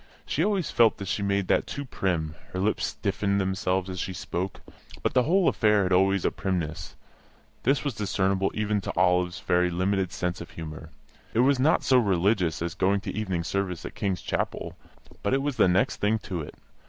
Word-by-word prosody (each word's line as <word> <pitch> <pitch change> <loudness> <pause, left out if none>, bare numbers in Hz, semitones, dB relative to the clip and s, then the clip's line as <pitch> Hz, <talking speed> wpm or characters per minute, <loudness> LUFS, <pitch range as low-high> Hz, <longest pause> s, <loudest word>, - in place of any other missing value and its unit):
She 155 - 0
always 195 -3 0
felt 115 -2 +4
that 100 - -6
she 100 - -1
made 100 -1 0
that - - +2
too 140 - -5
prim; 85 - -1 0.2
her 95 - -2
lips 105 +3 +1
stiffened 100 -1 -1
themselves 95 -1 0
as 95 -1 -5
she 95 - -3
spoke. 90 +1 -4 0.4
But - - +1
the 125 - +5
whole 175 +7 +3
affair 105 -3 +3
had 90 0 +1
always 95 +1 +3
a - - +3
primness; 85 -5 -3 0.7
this 135 +3 +2
was 145 -3 -1
discernible 95 -2 0
even 105 -1 0
to - - -5
Olive's 90 0 +2
very 90 0 +2
limited 95 +1 0
sense 90 -1 -3
of 85 - -8
humour. 80 0 -8 0.5
It 115 - +5
was 135 +1 +3
not 150 +5 +3
so 130 -1 +5
religious 95 -5 +1
as 85 -1 -3
going 100 +1 +1
to - - -5
evening 95 -5 -2
service 95 -1 -2
at - - -6
King's 95 -3 -2
Chapel; - - -3 0.5
but 100 - +1
it 135 - 0
was 145 -3 -2
the 105 - +5
next 90 +2 +2
thing 105 +2 +1
to 95 -5 -5
it. 75 - -9
95 Hz, 200 wpm, -27 LUFS, 90-105 Hz, 0.7 s, the